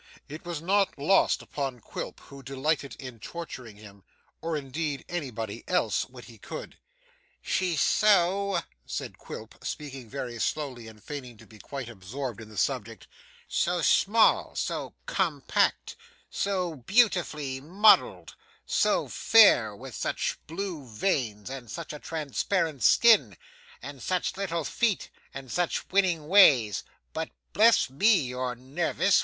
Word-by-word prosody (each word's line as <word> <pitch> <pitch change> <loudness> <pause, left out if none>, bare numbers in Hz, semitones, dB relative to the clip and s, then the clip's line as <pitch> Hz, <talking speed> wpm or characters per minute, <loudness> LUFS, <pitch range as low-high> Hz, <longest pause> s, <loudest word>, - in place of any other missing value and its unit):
It 155 +4 -9
was 170 -3 -5
not 195 +2 +2
lost 160 +8 +3
upon 135 -4 -4
Quilp, - - -7
who 140 -1 -12
delighted 140 +2 -2
in 125 -4 -9
torturing 130 -6 -8
him, 100 -2 -15 0.4
or 165 -1 -2
indeed 145 0 -4
anybody 120 -10 -5
else, 180 - +1
when - - -12
he - - -14
could. - - -8 0.6
'She's 180 -5 0
so,' 200 -1 +3 0.2
said - - -6
Quilp, - - -10
speaking 135 -5 -6
very 125 -3 -5
slowly, 130 -4 -2
and 110 -2 -14
feigning 130 -6 -7
to - - -15
be 110 - -16
quite 135 +4 -6
absorbed 115 +3 -6
in 110 - -11
the 105 - -12
subject, 115 -1 -2 0.4
'so 175 -1 0
small, 220 +7 +4
so - - -3
compact, - - 0 0.4
so 185 -5 -1
beautifully 150 - +1
modelled, 195 +9 +4 0.3
so - - +2
fair, 120 - +5
with 130 +3 -10
such - - -2
blue 170 -2 -4
veins 115 - -2
and 130 -3 -7
such 115 - -6
a 150 - -7
transparent 160 0 -2
skin, 165 - +5 0.5
and 140 -1 -8
such 185 +5 -1
little 170 -4 -2
feet, 220 +4 -1 0.2
and 135 -2 -9
such 175 -1 -1
winning 180 -6 +2
ways 140 - +6 0.3
but - - -3 0.2
bless 225 +2 +5
me, 205 +11 +5
you're 125 -1 -3
nervous! 160 +9 +1
145 Hz, 135 wpm, -28 LUFS, 125-180 Hz, 0.6 s, ways